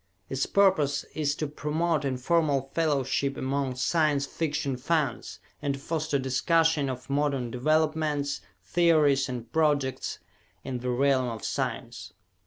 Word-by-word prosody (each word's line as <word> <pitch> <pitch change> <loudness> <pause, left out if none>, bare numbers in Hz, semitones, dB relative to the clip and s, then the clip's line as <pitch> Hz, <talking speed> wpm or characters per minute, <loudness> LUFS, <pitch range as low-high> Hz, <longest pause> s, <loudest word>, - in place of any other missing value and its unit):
Its 135 0 -1
purpose 155 -8 +3
is 145 -2 0
to 155 - -2
promote 150 +2 -1
informal 135 +1 +1
fellowship 140 -3 0
among 135 -1 -1
Science 145 +2 +1
Fiction 145 -3 -2
fans 140 -2 -1 0.2
and 140 -1 -1
to - - -9
foster 155 0 -1
discussion 145 +3 +2
of 130 0 -6
modern 140 -4 0
developments, 155 +1 0 0.2
theories 150 -6 +3
and 120 -2 -6
projects 145 -5 +1 0.5
in 130 -2 -4
the 125 +1 -3
realm 130 0 +2
of 115 -2 -6
science. - - -4
140 Hz, 125 wpm, -27 LUFS, 130-155 Hz, 0.5 s, purpose